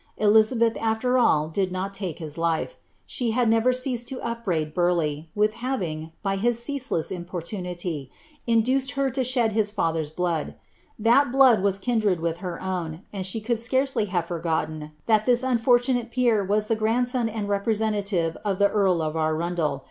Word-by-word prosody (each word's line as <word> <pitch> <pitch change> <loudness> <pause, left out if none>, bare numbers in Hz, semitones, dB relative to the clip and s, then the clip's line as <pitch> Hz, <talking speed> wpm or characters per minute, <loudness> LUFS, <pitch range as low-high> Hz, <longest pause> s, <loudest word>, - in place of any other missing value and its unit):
Elizabeth, 220 +2 +4
after 225 +3 +1
all. 155 -10 +3
dill 185 +4 -1
not 195 +2 -4
lake 180 -5 -3
hie 160 -3 -6
life. 165 - -1 0.3
She 240 -3 -2
bad 250 -2 +2
never 225 +3 +3
ceased 250 -2 -2
to 265 - -5
upbraid 180 -10 -2
Burleigli, 165 -3 0
villi 210 +1 +3
having, 180 -11 -4
by 195 -1 0
his 235 +3 +1
ceaseless 260 - -2
itiiporluniiy, 175 -4 -5 0.4
induced 255 +4 +2
her 275 -1 0
to 260 +1 -1
shed 240 -3 +1
his 215 -1 +2
father's 165 -7 -1
blood 165 -1 -2 0.3
— - - -36
ibal 240 +3 +5
blood 260 -4 +6
which - - -4
was 195 -1 +2
kindred 210 -4 0
with 165 0 -2
her 175 -2 -5
own, 175 -2 -4
and 190 -2 -2
abe 220 - -4
could 235 -1 0
scarcely 260 0 +1
have 175 -4 -2
rorgotten 160 -2 -2 0.2
iliat 215 -2 +3
tliia 250 0 +3
uofortuDoic 245 0 +2
peer 235 -5 +2
was 210 +2 +1
the 225 - +1
grandson 235 +2 +1
tmJ 215 -1 -4
rcprescnialive 200 -4 0
of 200 -2 -1
an 200 0 +4
earl 190 -5 +2
of 155 0 -3
Arundel. 160 -1 -1
205 Hz, 170 wpm, -25 LUFS, 170-235 Hz, 0.4 s, blood